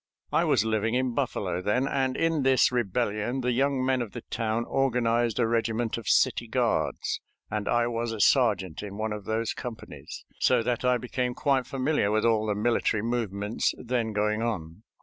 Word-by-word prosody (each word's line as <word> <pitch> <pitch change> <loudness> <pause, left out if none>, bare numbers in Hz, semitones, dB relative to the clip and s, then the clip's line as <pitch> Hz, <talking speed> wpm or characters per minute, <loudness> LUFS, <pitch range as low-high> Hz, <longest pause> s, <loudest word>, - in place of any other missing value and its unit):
I - - +2
was 110 - +2
living 110 +1 0
in 130 -1 0
Buffalo 90 - -2
then, 125 +8 +1
and 130 -1 0
in 165 -2 +1
this 130 -1 +4
rebellion 120 +1 -1
the 125 0 0
young 135 +1 +1
men 130 -1 +1
of 115 -4 -5
the 120 - -7
town 115 0 -1
organized 120 -3 +1
a 120 - +3
regiment 115 0 0
of 115 -4 -7
city - - +3
guards, - - 0 0.3
and 105 -1 -2
I 120 0 +2
was 120 0 -2
a 110 - -5
sergeant 100 - +2
in 100 -1 -7
one 110 0 -2
of 105 -2 -7
those 110 +1 -1
companies, 120 -3 -8
so - - +3
that 120 +1 -1
I 125 0 +3
became 125 +1 -3
quite 135 -3 +1
familiar 135 -5 0
with 110 +1 +1
all 110 -2 +2
the 105 - 0
military 110 -1 +1
movements 110 -3 -1
then 120 -2 -2
going 105 +1 0
on. 100 -6 -3
115 Hz, 185 wpm, -27 LUFS, 110-125 Hz, 0.3 s, this